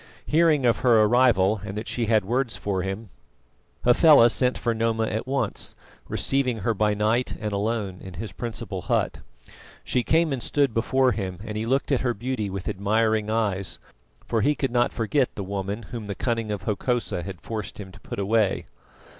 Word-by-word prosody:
Hearing 155 Hz, -4 st, +3 dB
of 120 Hz, -, +4 dB
her 115 Hz, -4 st, +5 dB
arrival 110 Hz, -4 st, +3 dB
and 100 Hz, 0 st, -6 dB
that 110 Hz, -, -5 dB
she 115 Hz, -2 st, -1 dB
had 110 Hz, -3 st, +3 dB
words 120 Hz, +2 st, 0 dB
for 95 Hz, -2 st, -2 dB
him, 95 Hz, +3 st, -5 dB, 0.8 s
Hafela 125 Hz, -1 st, +7 dB
sent 125 Hz, +1 st, +1 dB
for 120 Hz, -, 0 dB
Noma 115 Hz, 0 st, 0 dB
at 110 Hz, +3 st, -3 dB
once, 130 Hz, -5 st, -2 dB, 0.3 s
receiving 130 Hz, -5 st, 0 dB
her 115 Hz, +4 st, +1 dB
by 105 Hz, 0 st, +1 dB
night 110 Hz, +4 st, +1 dB
and 105 Hz, -1 st, -3 dB
alone 100 Hz, -2 st, -2 dB
in 95 Hz, -2 st, -9 dB
his 105 Hz, +3 st, -6 dB
principal 115 Hz, +3 st, -5 dB
hut. -, -, 0 dB, 0.6 s
She 125 Hz, -, 0 dB
came 160 Hz, +3 st, +2 dB
and 130 Hz, -, -3 dB
stood 140 Hz, -2 st, +1 dB
before 130 Hz, +3 st, +2 dB
him, 95 Hz, -5 st, -3 dB
and 105 Hz, -1 st, -5 dB
he 110 Hz, +1 st, -2 dB
looked 135 Hz, +4 st, 0 dB
at 135 Hz, -, +2 dB
her 120 Hz, -2 st, 0 dB
beauty 115 Hz, -2 st, -3 dB
with 95 Hz, -1 st, -5 dB
admiring 110 Hz, +2 st, +1 dB
eyes, 100 Hz, -4 st, -1 dB, 0.5 s
for 115 Hz, -, +1 dB
he 145 Hz, +5 st, +2 dB
could 135 Hz, -4 st, -1 dB
not 120 Hz, 0 st, +2 dB
forget 125 Hz, +3 st, 0 dB
the 100 Hz, -, -4 dB
woman 100 Hz, +3 st, -4 dB
whom 110 Hz, 0 st, -7 dB
the 100 Hz, -, -4 dB
cunning 115 Hz, -3 st, -1 dB
of 105 Hz, -1 st, -3 dB
Hokosa 115 Hz, -2 st, -1 dB
had 90 Hz, 0 st, -7 dB
forced 110 Hz, -2 st, -6 dB
him 95 Hz, -2 st, -8 dB
to -, -, -15 dB
put -, -, -7 dB
away. 100 Hz, 0 st, +1 dB
110 Hz, 190 wpm, -25 LUFS, 100-125 Hz, 0.8 s, Hafela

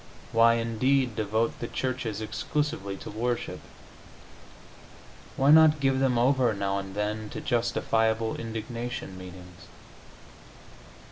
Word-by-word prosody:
Why, 115 Hz, +1 st, +5 dB
indeed, 115 Hz, +2 st, +1 dB
devote 110 Hz, +1 st, -1 dB
the 120 Hz, -, -4 dB
churches 125 Hz, -5 st, -3 dB
exclusively 115 Hz, 0 st, -3 dB
to -, -, -8 dB
worship? 120 Hz, +3 st, -2 dB, 1.8 s
Why 135 Hz, +2 st, +4 dB
not 155 Hz, -1 st, +7 dB
give 135 Hz, -1 st, +2 dB
them 130 Hz, -2 st, +2 dB
over, 125 Hz, -2 st, +3 dB
now 100 Hz, 0 st, -1 dB
and 95 Hz, 0 st, -8 dB
then, 105 Hz, +1 st, -2 dB
to -, -, -6 dB
justifiable 115 Hz, -2 st, 0 dB
indignation 115 Hz, -1 st, -5 dB
meetings? 90 Hz, -1 st, -12 dB
115 Hz, 110 wpm, -27 LUFS, 105-130 Hz, 1.8 s, not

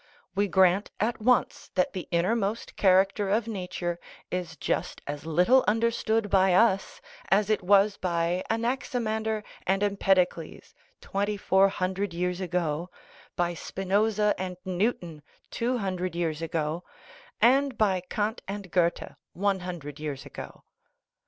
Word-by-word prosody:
We 200 Hz, +2 st, +1 dB
grant 190 Hz, +1 st, +3 dB
at 220 Hz, +2 st, -1 dB
once 250 Hz, +2 st, +1 dB
that 185 Hz, -1 st, +1 dB
the 185 Hz, -, -5 dB
innermost 200 Hz, +5 st, 0 dB
character 195 Hz, +1 st, +3 dB
of 215 Hz, +3 st, +1 dB
nature 180 Hz, -4 st, -4 dB, 0.3 s
is 175 Hz, -3 st, -4 dB
just -, -, -2 dB
as 145 Hz, +2 st, -6 dB
little 180 Hz, +11 st, +4 dB
understood 225 Hz, 0 st, +1 dB
by 190 Hz, -2 st, +4 dB
us 195 Hz, -1 st, +2 dB, 0.3 s
as 205 Hz, +2 st, +3 dB
it 215 Hz, -, +1 dB
was 200 Hz, +2 st, +4 dB
by 175 Hz, 0 st, 0 dB
Anaximander 225 Hz, -2 st, -1 dB, 0.2 s
and 195 Hz, +2 st, +2 dB
Empedocles 190 Hz, -4 st, 0 dB, 0.3 s
twenty 205 Hz, +1 st, -2 dB
four 195 Hz, 0 st, +4 dB
hundred 190 Hz, -1 st, -2 dB
years 180 Hz, +1 st, -1 dB
ago, 175 Hz, -2 st, -1 dB, 0.5 s
by 175 Hz, 0 st, 0 dB
Spinoza 205 Hz, +4 st, +1 dB
and 185 Hz, -1 st, -4 dB
Newton 180 Hz, -4 st, -2 dB, 0.3 s
two 245 Hz, +2 st, 0 dB
hundred 185 Hz, -4 st, -3 dB
years 165 Hz, -2 st, -2 dB
ago, 165 Hz, +1 st, -2 dB, 0.6 s
and 265 Hz, +1 st, +4 dB
by 195 Hz, -4 st, +2 dB
Kant 215 Hz, +2 st, -1 dB
and 195 Hz, -2 st, -6 dB
Goethe 175 Hz, -2 st, +1 dB, 0.2 s
one 195 Hz, +1 st, 0 dB
hundred 165 Hz, -5 st, -7 dB
years 145 Hz, -3 st, -5 dB
ago. -, -, -10 dB
190 Hz, 130 wpm, -27 LUFS, 175-210 Hz, 0.6 s, little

